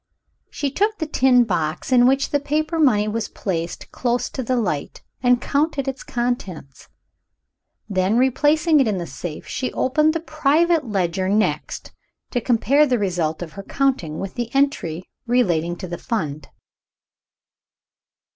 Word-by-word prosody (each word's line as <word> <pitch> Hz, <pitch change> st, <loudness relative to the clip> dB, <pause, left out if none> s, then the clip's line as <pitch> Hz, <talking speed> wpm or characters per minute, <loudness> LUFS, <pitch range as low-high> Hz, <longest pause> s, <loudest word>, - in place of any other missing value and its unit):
She 285 Hz, -2 st, -3 dB
took 420 Hz, +7 st, 0 dB
the 315 Hz, -, -2 dB
tin 255 Hz, -4 st, +4 dB
box 170 Hz, -, -2 dB
in 245 Hz, -1 st, +6 dB
which 270 Hz, +1 st, +2 dB
the 290 Hz, -, +2 dB
paper 310 Hz, +3 st, -1 dB
money 215 Hz, -9 st, +3 dB
was 220 Hz, +1 st, -2 dB
placed 170 Hz, -3 st, -4 dB
close 245 Hz, 0 st, -1 dB
to 265 Hz, -, -4 dB
the 255 Hz, +1 st, -1 dB
light, 180 Hz, -, -2 dB, 0.2 s
and 245 Hz, -1 st, +4 dB
counted 280 Hz, +1 st, 0 dB
its 270 Hz, 0 st, -3 dB
contents. 220 Hz, -, -4 dB, 1.0 s
Then, 195 Hz, +1 st, +1 dB
replacing 295 Hz, +5 st, +3 dB
it 265 Hz, -, +3 dB
in 205 Hz, -3 st, 0 dB
the 175 Hz, -, -3 dB
safe, 165 Hz, -2 st, -7 dB
she 255 Hz, -, -3 dB
opened 305 Hz, +4 st, +2 dB
the -, -, +1 dB
private 310 Hz, 0 st, +1 dB
ledger 185 Hz, -2 st, 0 dB
next, 210 Hz, +2 st, -1 dB, 0.4 s
to 245 Hz, -, 0 dB
compare 265 Hz, +6 st, +3 dB
the 250 Hz, -2 st, +2 dB
result 175 Hz, -5 st, -1 dB
of 165 Hz, -, -9 dB
her 195 Hz, -, -8 dB
counting 195 Hz, -, -1 dB
with 195 Hz, -1 st, -5 dB
the 240 Hz, -1 st, -3 dB
entry 185 Hz, -, 0 dB, 0.2 s
relating 175 Hz, -9 st, +1 dB
to 185 Hz, +1 st, -7 dB
the 175 Hz, 0 st, -6 dB
Fund. 155 Hz, -10 st, -3 dB
245 Hz, 150 wpm, -21 LUFS, 185-280 Hz, 1.0 s, in